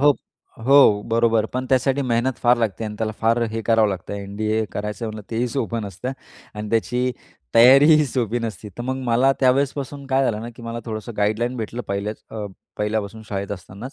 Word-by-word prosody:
हो, 145 Hz, +1 st, +6 dB, 0.6 s
हो, 135 Hz, -7 st, +6 dB
बरोबर 115 Hz, -1 st, +3 dB
पण 130 Hz, +1 st, -2 dB
त्यासाठी 135 Hz, +1 st, +2 dB
मेहनत 125 Hz, 0 st, 0 dB
फार 120 Hz, 0 st, +5 dB
लागते 110 Hz, -1 st, -1 dB
आणि 105 Hz, -, -5 dB
त्याला 110 Hz, -1 st, -1 dB
फार 115 Hz, +1 st, +2 dB
हे 115 Hz, +1 st, -3 dB
करावं 115 Hz, -1 st, +3 dB
लागतं, 95 Hz, -1 st, -5 dB
एन-डी-ए 105 Hz, +2 st, -2 dB
करायचं 105 Hz, +3 st, -4 dB
म्हणलं 110 Hz, -1 st, -6 dB
तेही 120 Hz, +2 st, 0 dB
सोपं 115 Hz, -2 st, -2 dB
नसतं 100 Hz, +6 st, -5 dB, 0.4 s
आणि 105 Hz, 0 st, -5 dB
त्याची 125 Hz, +2 st, +1 dB, 0.4 s
तयारी 130 Hz, +5 st, +8 dB
ही 150 Hz, 0 st, +4 dB
सोपी 120 Hz, -2 st, -1 dB
नसते. 110 Hz, -2 st, -5 dB
तर -, -, -3 dB
मग 130 Hz, +2 st, -2 dB
मला 125 Hz, +4 st, +4 dB
त्यावेळेसपासून 140 Hz, +1 st, +1 dB
काय 135 Hz, 0 st, +2 dB
झालं 110 Hz, -3 st, 0 dB
ना, 115 Hz, -, -6 dB
की 120 Hz, -, -11 dB
मला 115 Hz, 0 st, -5 dB
थोडंसं 110 Hz, +1 st, -5 dB
गाईडलाईन 110 Hz, +4 st, 0 dB
भेटलं, 115 Hz, +2 st, -4 dB
पहिल्या 100 Hz, +2 st, -2 dB, 0.2 s
अ, 105 Hz, -1 st, -3 dB, 0.3 s
पहिल्यापासून 105 Hz, 0 st, -2 dB
शाळेत 100 Hz, -1 st, -4 dB
असतानाच, 100 Hz, +6 st, -8 dB
115 Hz, 185 wpm, -22 LUFS, 105-125 Hz, 0.6 s, तयारी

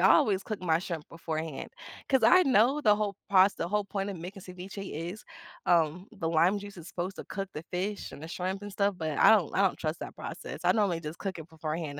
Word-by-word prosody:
always 195 Hz, -2 st, +3 dB
cook 215 Hz, -4 st, -5 dB
my 165 Hz, -2 st, +2 dB
shrimp 170 Hz, -4 st, -5 dB
beforehand 160 Hz, -3 st, -5 dB, 0.4 s
'cause 265 Hz, -2 st, +3 dB
I 365 Hz, 0 st, +7 dB
know 265 Hz, +3 st, +4 dB
the 210 Hz, -4 st, +5 dB
whole 205 Hz, -2 st, -1 dB
proc 195 Hz, 0 st, +6 dB
the 170 Hz, -, -2 dB
whole 210 Hz, 0 st, +1 dB
point 200 Hz, 0 st, -3 dB
of 190 Hz, -, -5 dB
making 185 Hz, +4 st, -8 dB
ceviche 190 Hz, +2 st, -8 dB, 0.2 s
is, 210 Hz, +4 st, -8 dB, 0.4 s
um, 170 Hz, +3 st, +2 dB
the 185 Hz, -7 st, -3 dB
lime 175 Hz, +5 st, +3 dB
juice 200 Hz, -2 st, -10 dB
is 170 Hz, -, -9 dB
supposed 185 Hz, +2 st, -4 dB
to -, -, -7 dB
cook 195 Hz, 0 st, -4 dB
the 150 Hz, -, -6 dB
fish 195 Hz, +3 st, -3 dB
and 145 Hz, -, -10 dB
the 160 Hz, -, -7 dB
shrimp 185 Hz, +3 st, -3 dB
and 205 Hz, 0 st, -7 dB
stuff, 200 Hz, -1 st, +1 dB
but 155 Hz, -3 st, -2 dB
I -, -, +7 dB
don't 195 Hz, -9 st, +3 dB
I -, -, +4 dB
don't 195 Hz, -2 st, +2 dB
trust 155 Hz, 0 st, -3 dB
that -, -, -7 dB
process. -, -, -7 dB
I -, -, +6 dB
normally 195 Hz, -6 st, +2 dB
just 155 Hz, +1 st, -7 dB
cook 190 Hz, -4 st, -4 dB
it 160 Hz, -, -9 dB
beforehand 155 Hz, -2 st, -4 dB
185 Hz, 235 wpm, -29 LUFS, 165-205 Hz, 0.4 s, I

